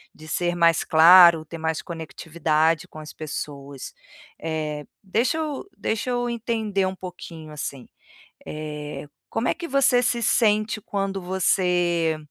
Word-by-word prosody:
de 155 0 -13
ser 175 +2 -1
mais 170 -1 +3
claro, 170 0 +7
ter 165 +2 -8
mais 160 0 -1
conectividade 160 -1 -1
com - - -14
as 155 -1 -10
pessoas. 140 -3 -7 0.5
Eh, 155 -2 -3 0.2
deixa 230 - 0
eu 305 -3 -3
deixa 225 +3 -2
eu 245 0 0
entender 220 -4 -1
pouquinho, 165 -4 -9
assim. 140 -3 -6 0.6
Eh, 150 -1 -6 0.2
como 225 +2 -1
é - - +2
que 345 -1 -7
você 265 -2 +3
se 235 0 0
sente 215 -1 +2
quando 195 -1 -3
você 175 -3 +1
175 Hz, 130 wpm, -24 LUFS, 155-215 Hz, 0.6 s, claro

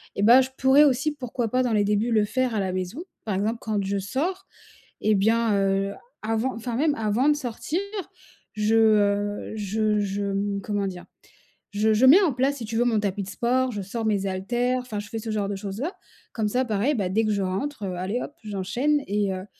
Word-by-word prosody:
et 200 - -1
bah, 240 +4 +8
je 260 - -2
pourrais 270 +3 +6
aussi 280 +3 +2
pourquoi 250 -4 -3
pas 255 +2 +1
dans 240 -3 0
les 205 -1 +3
débuts 210 +3 +1
le 215 -2 +4
faire 250 +2 -1
à 205 - +1
la 190 -1 -1
maison, 185 - -4 0.2
par 210 -4 -1
exemple, 215 +4 0
quand 210 -2 -2
je 200 +1 -1
sors 335 - -3 0.5
et 215 0 +3
bien, 225 +2 +2
heu, 195 0 +1 0.3
avant 225 +4 0
enfin 230 +1 -4
même 295 +4 +2
avant 225 +6 +1
de 295 - +4
sortir 290 +5 -3 0.7
je, 215 +1 +1
heu, 205 -2 +2
je 210 +1 0
je 200 0 -2
m 200 0 -1
comment 205 -2 -1
dire? 180 -2 -7 0.7
Je 215 +2 +2
je 250 +5 +4
mets 330 +10 +8
en 320 -9 +2
place 275 +2 +1
si 235 - -6
tu 225 +1 -5
veux 240 - +3
mon 225 -3 +2
tapis 200 -1 -2
de 190 - -8
sport 255 +2 0
je 205 -2 -4
sors 220 +4 -4
mes 200 -2 +1
haltères 240 +7 -1
enfin 220 -5 -5
je 205 - -8
fais 225 - -5
ce 220 0 -5
genre 205 -2 -1
de 200 - -2
choses 195 +2 -6
là 340 +6 -3 0.4
comme 220 -2 -1
ça 250 +4 +1
pareil, 225 +6 +1
bah, 195 -5 -1
dès 220 +4 +1
que 215 - +1
je 200 - 0
rentre, 210 +6 -3
heu, 185 -1 -3
allez 195 +7 -2
hop 290 - -6
j'enchaîne 215 +9 0
et 200 -1 0
heu, 185 +1 -6
215 Hz, 225 wpm, -25 LUFS, 200-250 Hz, 0.7 s, bah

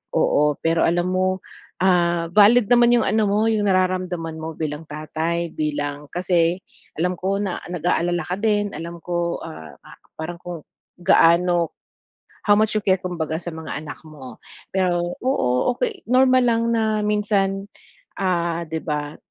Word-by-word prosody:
oo. 150 0 +3
Pero 165 0 +2
alam 175 +2 +1
mo, 185 0 0 0.4
ah, 170 -2 +2
valid 210 +4 +5
naman 240 0 +6
yung 235 - +3
ano 215 -1 +1
mo, 210 +3 +2
yung 210 -2 +1
nararamdaman 185 -3 0
mo 160 0 -6
bilang 155 0 -5
tatay, 160 +3 -3
bilang 145 -1 -3
kasi 175 +1 +1 0.3
alam 180 +3 -1
ko 195 +2 0
na 190 -3 -3
nag-aalala 175 0 0
ka 180 +2 -4
din. 205 -1 +1
Alam 170 -1 -8
ko, 175 -1 -2
ah, 80 - -9
pa - - -14 0.2
parang 170 +2 -6
kung 175 -3 -8 0.4
gaano 170 0 +3 0.7
how 205 -1 +4
much 215 0 +2
you 215 - +1
care, 190 -2 +3
kumbaga 170 -4 -3
sa 175 0 -6
mga 160 0 -8 0.2
anak 155 - -8
mo. 135 -7 -11 0.4
Pero 175 -2 0
oo, 125 - +1
okey 445 -6 -3
normal 255 +1 +5
lang 230 -2 +2
na 220 -1 +1
minsan, 205 -2 0 0.5
ah, 170 -3 -1
'di 160 0 -4
ba, 150 -1 -3
175 Hz, 150 wpm, -22 LUFS, 165-200 Hz, 0.7 s, naman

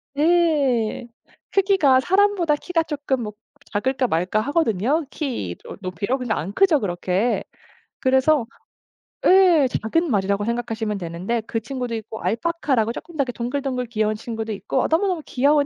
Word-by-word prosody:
예. 290 -9 +2 0.4
크기가 380 -10 +4
사람보다 380 -1 +2
키가 330 +2 -1
쪼끔 285 -5 -2
뭐 210 -1 -5 0.4
작을까 255 +5 0
말까 180 +3 0
하거든요, 285 - +1
키로 235 - -5
높이로. 190 +7 -2
근데 250 -4 -2
안 175 +7 -4
크죠, 375 -6 +4
그렇게. 190 +3 0 0.6
그래서 265 0 +3 0.8
예. 360 -7 +6
작은 325 +9 0
말이라고 200 -1 +1
생각하시면 225 -2 -2
되는데 185 +6 -3
그 225 - -1
친구도 250 -1 -4
있고 220 0 -7
알파카라고 255 -3 0
쪼끔 325 +7 -9
더 280 - +3
이렇게 250 - -4
동글동글 250 +1 -2
귀여운 215 -2 0
친구도 225 0 -5
있고 250 +6 -1
너무너무 350 0 +1
귀여운 285 +3 +3
255 Hz, 340 characters per minute, -22 LUFS, 220-305 Hz, 0.8 s, 예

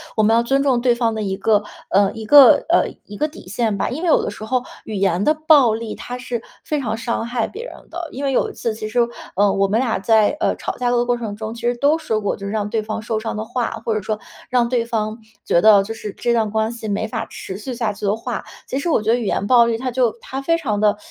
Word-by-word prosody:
我 215 - +3
们 220 +2 +4
要 235 - +3
尊 270 +3 +1
重 265 -4 +2
对 245 0 +3
方 230 -2 0
的 215 - -2
一 190 -1 -2
个， 210 0 +2 0.3
呃 200 +1 +3
一 225 -1 -7
个 275 +3 +8
呃， - - +4 0.2
一 205 - -10
个 305 - +1
底 295 -11 -13
线 220 +1 -1
吧， - - -1
因 305 +7 -5
为 - - 0
有 320 - +4
的 - - -2
时 215 - -8
候 255 +2 0 0.2
语 220 - -6
言 195 -2 +1
的 305 - +4
暴 305 -7 +5
力， 225 -1 -4
它 245 - -7
是 245 -2 -4 0.2
非 300 - -1
常 225 -5 -2
伤 230 0 -2
害 235 -1 -1
别 450 +4 -8
人 - - -8 0.2
的。 340 0 -5
因 275 +3 -6
为 275 - +1
有 260 - +1
一 - - -15
次 230 -2 -3
其 215 0 -5
实， 240 +3 -1 0.4
嗯， 200 0 +3
我 195 0 +3
们 210 +4 +1
俩 245 -3 0
在， 220 +7 +3
呃， - - +1
吵 - - -4
架 245 -1 0
的 240 0 +2
过 245 0 +1
程 220 -4 -5
中， 220 +1 -6
其 230 - -10
实 240 +1 +1
都 290 +5 +3
说 220 -9 -2
过 200 - -1
就 200 - -8
是 200 - -3
让 210 -1 -2
对 220 0 -1
方 215 +1 -4
受 220 -1 -2
伤 225 0 -4
的 215 - -3
话， 235 +1 -2
或 225 - -1
者 215 - -1
说 210 +2 -3 0.3
让 245 -2 +2
对 235 -2 +1
方 220 -1 -2 0.3
觉 170 - +3
得 215 -2 +7
就 225 - -5
是 215 -2 -6
这 240 -1 0
段 220 -2 +1
关 220 +1 0
系 230 -2 -7
没 205 +2 -1
法 - - -4
持 190 - -7
续 250 +5 -6
下 230 -3 -1
去 205 - -6
的 200 +1 +2
话。 230 +2 -5 0.2
其 265 - -3
实 310 - -2
我 310 - +2
觉 220 +2 +1
得 240 - +3
语 240 - -3
言 200 - -1
暴 240 -2 +6
力 230 -1 0
它 255 +2 -3
就 245 -2 +2
它 265 +1 -5
非 330 +4 +2
常 220 -11 -2
地 210 -1 +3
225 Hz, 310 characters per minute, -20 LUFS, 215-250 Hz, 0.4 s, 个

